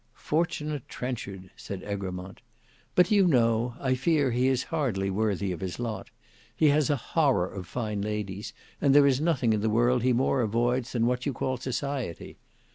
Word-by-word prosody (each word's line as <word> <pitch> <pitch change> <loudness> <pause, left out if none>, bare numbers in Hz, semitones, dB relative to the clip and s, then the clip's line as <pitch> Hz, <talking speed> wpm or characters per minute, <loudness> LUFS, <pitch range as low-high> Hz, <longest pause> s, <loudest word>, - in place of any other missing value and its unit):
"Fortunate 150 -3 -2
Trenchard!" 100 -7 -5
said 95 -2 -7
Egremont. 95 -1 -5 0.5
"But 180 -1 +5
do 210 - +3
you 195 -2 +5
know 120 -4 +2
I 130 -2 +1
fear 140 +1 +2
he 125 +2 +2
is 130 -1 +1
hardly 105 -11 0
worthy 100 -1 0
of 85 - -4
his 95 0 -4
lot. 115 -3 -4 0.5
He 155 - +4
has 145 0 +3
a 145 - +3
horror 130 - +1
of 95 -2 -8
fine 105 0 -3
ladies; 105 -1 -4 0.3
and 140 -1 +4
there 145 -1 +8
is 135 0 +3
nothing 135 -9 +2
in 105 - 0
the 110 - +1
world 120 +3 +3
he 125 +2 +2
more 130 +2 +2
avoids 120 +3 0
than 115 -2 +1
what 125 +2 0
you 140 - 0
call 130 +2 -2
society. 130 - -4
120 Hz, 185 wpm, -27 LUFS, 105-135 Hz, 0.5 s, there